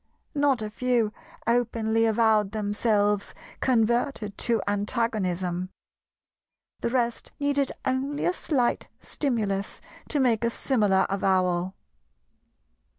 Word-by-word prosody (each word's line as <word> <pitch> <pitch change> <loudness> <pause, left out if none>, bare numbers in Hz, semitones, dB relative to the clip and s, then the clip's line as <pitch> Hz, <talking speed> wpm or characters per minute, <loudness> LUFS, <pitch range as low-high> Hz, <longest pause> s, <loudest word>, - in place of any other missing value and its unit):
Not 285 -6 +2
a 210 - -5
few 235 -2 +1 0.3
openly 230 -1 +1
avowed 220 -2 +3
themselves 205 -1 0 0.2
converted 235 -3 +1
to 235 -2 +2
antagonism; 195 -4 -1 1.1
the - - -1
rest 240 -2 -1
needed 285 -1 +1
only 270 +3 -1
a 355 - +2
slight 265 -9 0
stimulus 210 -8 -2 0.3
to 295 - 0
make 240 -4 +2
a 235 - +3
similar 210 -6 +2
avowal. 185 -1 +1
225 Hz, 95 wpm, -26 LUFS, 205-250 Hz, 1.1 s, avowed